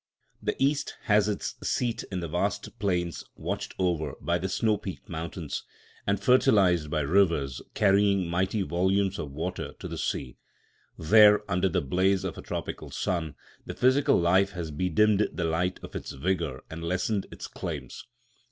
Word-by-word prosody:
The - - -1
East 145 +2 0
has 105 -4 +3
its 105 - -3
seat 120 -1 -1
in 90 -2 -2
the 85 - -3
vast 75 - -2
plains 90 -4 -1
watched - - -4
over 85 -6 0
by 85 +4 0
the 95 - -2
snow 110 +3 +2
peaked 95 -7 -7
mountains 80 -1 -5 0.4
and 100 0 +2
fertilised 100 - +4
by 75 0 0
rivers 75 -5 +2
carrying 100 -2 +3
mighty 95 +4 0
volumes 95 +3 +1
of 70 - -5
water 85 +6 -4
to - - -7
the - - -6
sea. 60 - -3 0.6
There, 105 +5 +6
under 95 -1 +1
the 90 - 0
blaze 95 +6 +1
of 95 -3 -3
a - - -8
tropical - - -5
sun, 80 -5 -2 0.3
the - - -7
physical 130 +3 +4
life 95 +3 +3
has 85 -3 -5
bedimmed 100 +6 +2
the 85 - -2
light 80 +3 0
of - - -9
its - - -5
vigour 85 -2 -2
and 80 +1 -7
lessened 95 +4 -1
its - - -8
claims. - - -6
90 Hz, 160 wpm, -28 LUFS, 85-100 Hz, 0.6 s, There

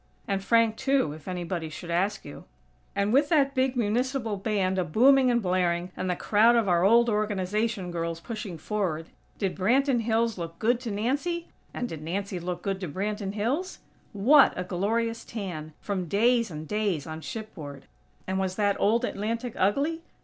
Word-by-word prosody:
(And 195 -1 -1
Frank, 230 0 +3
too, 265 - +1
if 155 -1 -13
anybody 175 -2 -3
should 170 +3 -7
ask 190 +5 0
you.) - - -10 0.5
And 200 +2 +1
with 285 +2 +4
that 280 -4 +3
big 260 -1 +1
Municipal 240 0 0
Band 195 -2 0
a - - +2
booming 255 - +5
and 240 -2 +2
blaring, 180 -1 0
and 185 - -3
the 180 - +1
crowd 220 +6 +4
of 230 -3 +2
our 175 -1 +3
old 235 +4 +5
Organization 210 -2 -1
girls 165 -1 -3
pushing 210 -3 -6
forward, 170 -3 -3 0.3
did 195 -3 -1
Branton 245 +6 +2
Hills 225 -2 0
look 165 0 -6
good 235 +2 +2
to 245 -2 -5
Nancy? 285 +12 -1 0.2
And 245 - -3
did 160 -9 -7
Nancy 185 +4 -3
look 175 +1 -5
good 195 -1 -2
to 185 - -4
Branton 200 +4 -3
Hills? 260 - -2 0.3
What 255 +8 +6
a 180 - -1
glorious 225 +6 -1
tan, 175 -8 -6
from 190 -4 -3
days 230 +5 +3
and 155 -1 -7
days 205 -8 -1
on 160 0 -6
shipboard! 160 - -8 0.4
And 190 0 -1
was 190 -1 -1
that 205 -1 +1
old 230 +4 +3
Atlantic 230 +3 -3
ugly? 280 - +1
205 Hz, 175 wpm, -27 LUFS, 180-235 Hz, 0.5 s, What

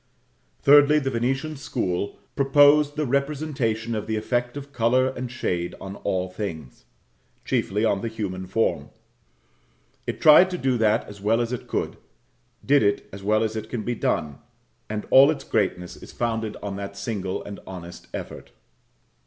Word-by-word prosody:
Thirdly, 145 +1 +7
the 135 -3 0
Venetian 135 +6 -1
school 100 -8 -3 0.2
propose 145 +1 +5
the 150 -1 -1
representation 135 -5 -1
of 105 -2 -3
the 110 - -1
effect 120 +4 -1
of 140 0 -9
colour 130 +2 +2
and 125 -1 -5
shade 90 -7 -2
on 95 +1 -7
all 95 0 -1
things; 90 - -7 0.6
chiefly 105 +4 0
on 100 -3 +1
the - - -2
human 95 -5 -5
form. 90 -7 0 1.2
It - - -3
tried 160 +4 +7
to 180 - -3
do 130 -5 +1
that 110 0 +2
as 100 -1 -11
well 110 +3 +2
as 120 +1 -1
it 125 - -5
could - - -2 0.7
did 145 +1 +5
it 100 -1 +1
as 100 - -8
well 110 +2 +2
as 110 0 -2
it 110 0 -5
can 120 -3 -3
be 120 - -1
done 75 -10 -1 0.5
and 105 0 -4
all 135 +2 +8
its 155 - -2
greatness 90 -4 -1
is - - -12
founded 110 -2 -2
on 100 -1 -4
that 100 0 -7
single 100 -2 -3
and 100 -1 -8
honest 90 -2 -9
effort. - - -8
110 Hz, 165 wpm, -24 LUFS, 100-135 Hz, 1.2 s, all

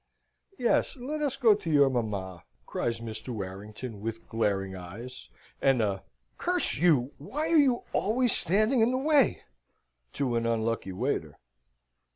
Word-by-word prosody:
"Yes, 240 - +1
let 290 +5 -4
us 280 -3 0
go 235 -6 +5
to 200 -5 -4
your 145 -3 +5
mamma," 100 -8 -3 0.2
cries 115 -1 -2
Mr. 110 0 -6
Warrington, 105 +2 -6
with 115 +1 -5
glaring 100 -4 -1
eyes 105 +9 -9 0.3
and 135 -2 +4
a 100 -3 0 0.4
"Curse - - 0
you, 145 -5 +3
why 300 - -3
are 330 - +6
you 260 -4 +3
always 240 +4 +2
standing 215 - +2
in 225 - +4
the 255 - +1
way?" 285 0 +3 0.7
to 130 -4 -1
an 115 0 0
unlucky 115 -3 -1
waiter. 95 - -2
125 Hz, 145 wpm, -28 LUFS, -, 0.7 s, are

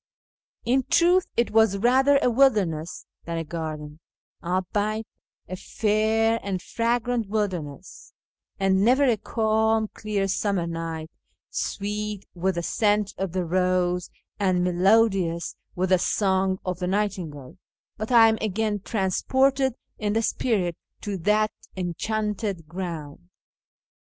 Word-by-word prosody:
In 255 +3 +3
truth 360 +2 +4
it 235 - +2
was 220 -2 +4
rather 260 +6 +4
a - - +4
wilderness 205 - +1 0.2
than 170 0 -3
a 165 - -2
garden 155 -2 -6 0.2
— - - -37
albeit 205 +5 -1 0.4
a 185 - -5
fair 220 +3 +1
and 195 -2 -3
fragrant 235 +2 -1
wilder 205 -5 0
ness; 145 -2 -11 0.5
and 195 0 +3
never 255 +6 +4
a 250 -4 +4
calm, 220 0 +1
clear 205 -2 -2
summer 195 -2 0
night, 165 -1 -5 0.4
sweet 210 0 -3
with 185 +1 -1
the 170 - -2
scent 210 +1 +1
of 190 -3 -2
the 185 -1 -1
rose 180 0 +1 0.3
and 185 -3 +2
melodious 180 -1 +2 0.2
with 185 +1 0
the 185 -1 +4
song 190 -1 +1
of 185 -1 -3
the 180 - -2
night 200 +1 0
ingale, 145 -3 -9 0.4
but 215 +3 -4
I 230 -2 +8
am 220 -1 +1
again 215 0 -1
transported 260 +7 +1 0.2
in 210 -1 -1
the 225 +1 +1
spirit 195 -8 0 0.3
to 205 -1 -3
that 210 +4 +2 0.3
enchanted 200 0 -2
ground. 170 -1 -6
200 Hz, 130 wpm, -25 LUFS, 180-220 Hz, 0.5 s, I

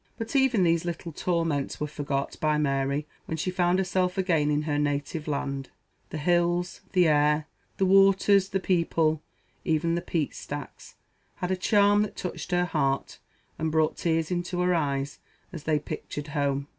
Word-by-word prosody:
But 225 +4 -5
even 260 -7 +4
these 170 -1 +2
little 170 -1 -4
torments 165 -4 -1
were 150 - -1
forgot 140 -2 -3
by 155 -1 +2
Mary 140 0 0 0.2
when 160 - -3
she 185 +4 -1
found 180 0 +2
herself 185 -1 0
again 165 -6 +2
in 150 0 +1
her 145 -1 0
native 145 +2 -2
land. 140 -2 -3 0.4
The - - -5
hills, 175 +2 +1
the 180 -3 +5
air, 150 0 +3 0.3
the 190 - +2
waters, 195 0 +5
the 195 - 0
people, 165 -4 +1 0.4
even 165 +1 +1
the 170 - 0
peat 165 -4 -2
stacks, 145 0 -8 0.4
had 180 - -3
a - - +2
charm 205 +2 +4
that 210 - -2
touched 180 - -5
her 180 -1 +2
heart, 140 -5 -1 0.4
and 160 0 -1
brought 155 0 +2
tears 165 0 0
into 175 0 -1
her 180 0 +2
eyes 140 -3 -1 0.3
as 165 -4 -8
they 155 -1 +2
pictured 145 0 -6
home. 140 -1 0
165 Hz, 170 wpm, -27 LUFS, 150-180 Hz, 0.4 s, the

